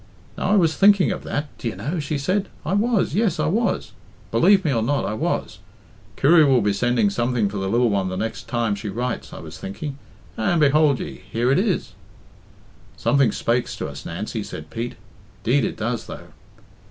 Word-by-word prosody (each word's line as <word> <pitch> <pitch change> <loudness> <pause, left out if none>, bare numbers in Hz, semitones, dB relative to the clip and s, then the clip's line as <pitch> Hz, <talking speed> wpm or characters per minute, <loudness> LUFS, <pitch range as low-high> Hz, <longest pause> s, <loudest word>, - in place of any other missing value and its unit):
"Now - - -2
I 210 - +4
was 165 -6 +3
thinking 200 +2 +5
of - - -4
that, 145 0 -4
d'ye 115 - -3
know?" 165 +4 -3
she 150 0 -2
said. 185 +8 -1 0.2
"I 175 - -1
was, 215 -4 +1
yes, 210 +2 +1
I - - +1
was; 210 +4 0 0.4
believe 190 - +4
me 145 - +2
or 115 - +1
not, 140 +5 0
I - - -2
was. 155 - -2 0.6
'Kirry 160 +3 +6
will 135 -4 +4
be 105 0 +2
sending 125 - +2
something 120 - 0
for 100 +1 -5
the 95 0 -2
lil 120 +4 +3
one 100 -3 0
the 95 - -4
next 110 +3 -4
time 115 -3 0
she 100 +1 -5
writes,' 120 +4 -3
I - - -8
was - - -10
thinking, 140 +8 -6 0.4
and 135 +10 +1
behould 150 -2 +4
ye - - -7
here 120 +3 +1
it 140 - +4
is." 195 -3 -1 1.0
"Something 140 -3 +3
spakes 120 +1 -1
to - - -4
us, - - -8
Nancy," 105 +6 -4
said 80 -6 -8
Pete. 115 +2 -4 0.5
"'Deed 130 +3 +2
it - - -2
does, 115 +1 -3
though." - - -9
135 Hz, 195 wpm, -22 LUFS, 115-170 Hz, 1.0 s, Kirry